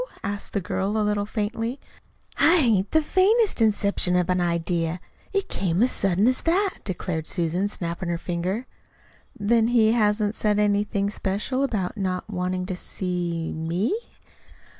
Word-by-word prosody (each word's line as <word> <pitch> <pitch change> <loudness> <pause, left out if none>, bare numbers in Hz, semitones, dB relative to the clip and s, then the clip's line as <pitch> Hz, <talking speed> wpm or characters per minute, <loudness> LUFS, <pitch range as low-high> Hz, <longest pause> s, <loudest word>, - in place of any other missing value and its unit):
asked 205 +1 -4
the 200 - +1
girl 195 +3 -2
a 215 - +1
little 205 -1 0
faintly. 225 +4 -3 0.6
"I 340 +3 +6
hain't 220 - +3
the 315 0 +3
faintest 395 - +3
inception 200 -4 +2
of 180 0 +2
an 180 0 +1
idea. 170 0 -1 0.3
It 395 -1 -1
came 185 +2 +1
as 255 - +3
sudden 195 +2 +2
as 255 0 +2
that," 380 +4 +1
declared 175 -4 -3
Susan, 175 +2 0
snapping 170 -2 -4
her 170 - 0
finger. 180 +7 -3 0.7
"Then 225 +2 +3
he 230 -2 +4
hasn't 210 -2 +2
said 210 -2 +1
anything 205 -1 +1
special 210 +7 -1
about 215 -7 -2
not 185 -2 -2
wanting 180 -2 -2
to 185 -1 -3
see 175 -3 -3
me?" 170 - -1
200 Hz, 150 wpm, -24 LUFS, 180-225 Hz, 0.7 s, I